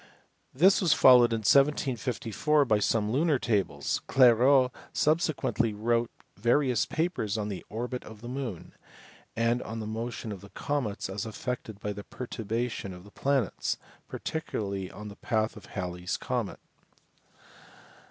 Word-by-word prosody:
This 185 +9 +5
was 170 -6 +4
followed 125 -2 +7
in 115 -1 0
1754 135 +2 +2
by 110 -4 +3
some 105 0 +1
lunar 150 +3 +2
tables; 95 - -1
Clairaut 130 +1 +5 0.2
subsequently 150 -7 +1
wrote 115 +2 +1 0.3
various 120 +2 +2
papers 155 - -1
on 105 -1 -2
the 95 - -5
orbit 125 +3 -4
of 110 -1 -12
the 120 - -8
moon, 125 -8 -5 0.6
and 115 +2 +1
on 115 0 -6
the 110 - -4
motion 115 +1 -4
of 100 -1 -8
comets 130 -9 -2
as 95 +3 -4
affected 110 -2 -5
by 105 0 -3
the 100 0 -8
perturbation 115 -4 -4
of 90 - -12
the 100 - -15
planets, 135 -6 0 0.3
particularly 100 - -4
on 105 0 -9
the 105 +1 -10
path 110 -2 -1
of 105 -2 -11
Hal 90 -3 -4
ley 90 0 -9
s 90 - -2
comet. - - -3
115 Hz, 145 wpm, -29 LUFS, 105-130 Hz, 0.6 s, followed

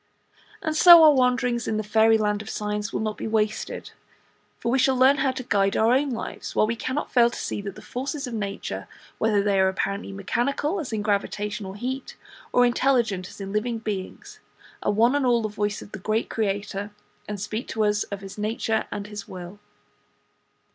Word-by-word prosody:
And 315 -1 -1
so 340 0 +9
our 305 -1 +8
wanderings 250 -2 +1
in 215 - 0
the 215 - -1
Fairy 220 +1 +4
land 210 -1 0
of 220 - -9
Science 210 0 -3
will - - -2
not 215 -1 -2
be - - -3
wasted, 215 -1 -2 0.7
for 235 - -1
we 265 - +2
shall 265 0 +3
learn 260 +2 +5
how 275 - +2
to 260 0 -4
guide 200 -4 +1
our 225 +2 +4
own 280 +2 +2
lives, 235 -3 -5
while - - +4
we 230 +2 -1
cannot 260 +5 -3
fail 240 -2 +5
to - - -8
see - - -3
that 200 -1 -6
the - - -12
forces 275 +3 -4
of 245 - -6
nature, 200 -3 -4 0.3
whether 210 -2 +2
they 200 -1 +2
are 190 - +5
apparently 195 +1 -3
mechanical, 250 - -1
as 295 -7 -5
in 215 -2 -2
gravitation 205 0 -2
or 190 - -7
heat; 260 +5 -5 0.3
or 245 - +5
intelligent, 240 -7 +1
as - - -13
in 195 0 -6
living 230 +2 -1
beings, 210 -4 -6 0.4
are - - +1
one 230 +5 +3
and 290 -1 +1
all 240 -2 +3
the - - 0
voice 210 0 -2
of - - -15
the 215 - -7
Great 215 +4 -1
Creator, 205 -1 -2 0.4
and 210 -1 -5
speak 215 +4 -4
to 220 - -1
us 210 0 +1
of 200 -1 -7
His 195 +1 -9
Nature 220 +1 -1
and 205 - -5
His 205 0 -8
Will. 180 +2 -9
215 Hz, 205 wpm, -25 LUFS, 205-245 Hz, 0.7 s, so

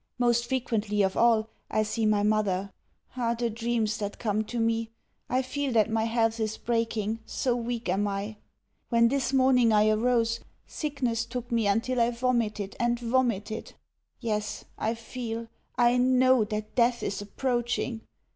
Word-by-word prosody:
Most 240 -1 +2
frequently 220 -5 0
of 190 0 0
all, 230 -2 +4 0.2
I 215 - +1
see 220 +1 0
my 210 -1 +3
mother. 200 -2 +1 0.4
Ah, 235 -2 0
the 235 0 -1
dreams 225 -1 -1
that 205 -1 -4
come 215 -1 0
to 240 +2 -4
me! 225 0 0 0.4
I 255 +2 +1
feel 275 +1 -2
that 220 -1 +3
my 220 0 +1
health 225 0 +1
is 220 -1 -1
breaking, 225 -2 -1
so 245 +2 -1
weak 240 0 -3
am 195 +3 +1
I. 200 +2 -4 0.5
When 235 -1 +4
this 275 0 0
morning 255 -3 +4
I 215 0 +4
arose, 230 +1 +2 0.3
sickness 255 -7 -2
took 245 +1 -6
me 230 -3 +2
until 230 +5 +1
I 230 - +4
vomited 235 -5 -1
and 240 0 +1
vomited. 230 -3 -1 0.4
Yes, 210 -2 -3
I 225 +2 -1
feel, 230 0 -6 0.3
I 240 0 +4
know, 255 -1 +4
that 215 0 -5
death 240 0 +2
is 200 - -2
approaching. 240 +1 -2
230 Hz, 155 wpm, -28 LUFS, 215-245 Hz, 0.5 s, all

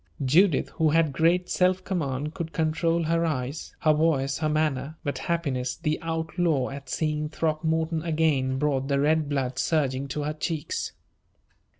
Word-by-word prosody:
Judith, 165 +4 +4
who 160 -1 +3
had 160 -2 +2
great 170 +5 +2
self 185 0 +2
command, 150 -5 -2
could 170 -3 -5
control 165 +1 +1
her 165 +1 +1
eyes, 145 -2 -3
her 155 -2 +4
voice, 145 -3 +1
her 155 -1 0
manner; 155 -1 -1
but 145 - -2
happiness, 135 -7 -1
the 155 -2 -1
outlaw, 160 -4 0
at 140 -1 -8
seeing 150 0 -1
Throckmorton 160 +1 0
again, 155 -5 +1
brought 135 -2 0
the 140 -1 +1
red 155 +1 +2
blood 135 -2 -1
surging 140 -4 0
to 145 +2 -3
her 150 +1 -2
cheeks. 155 0 -3
155 Hz, 155 wpm, -26 LUFS, 140-165 Hz, -, Judith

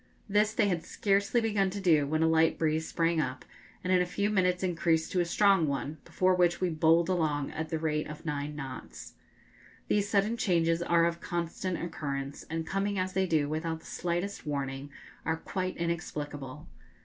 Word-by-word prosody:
This 210 +1 +3
they - - +3
had 175 -4 0
scarcely 200 +3 +1
begun 205 -4 +1
to 200 +2 -5
do 160 -7 +3
when 155 +2 +1
a - - +4
light 160 0 +3
breeze 160 0 0
sprang 165 -1 +1
up, 130 -2 -4 0.4
and 185 +1 +1
in 180 - +5
a - - +2
few 200 +3 0
minutes 180 -2 +2
increased 165 -3 +1
to 185 - +1
a 175 - +2
strong 195 -1 +4
one, 140 +2 -3
before 185 0 +2
which 175 -1 +3
we 185 - +1
bowled 165 +1 +4
along 155 -6 0
at 160 0 -4
the 160 - -1
rate 155 -1 -1
of 150 +2 -9
nine 150 -1 -3
knots. 135 -3 -8 0.8
These 205 0 +2
sudden 210 +2 +2
changes 165 -5 +2
are 170 -1 +3
of 170 0 -1
constant 175 +1 -3
occurrence, 140 -4 -4
and, 160 0 -2
coming 195 +3 -1
as 185 0 -1
they 190 -1 +1
do 155 -4 +2
without 160 +2 -2
the - - -19
slightest 175 +3 -3
warning, 140 -2 -3 0.3
are 160 +1 0
quite 185 +2 -3
inexplicable. 150 -5 -4
170 Hz, 185 wpm, -30 LUFS, 155-185 Hz, 0.8 s, in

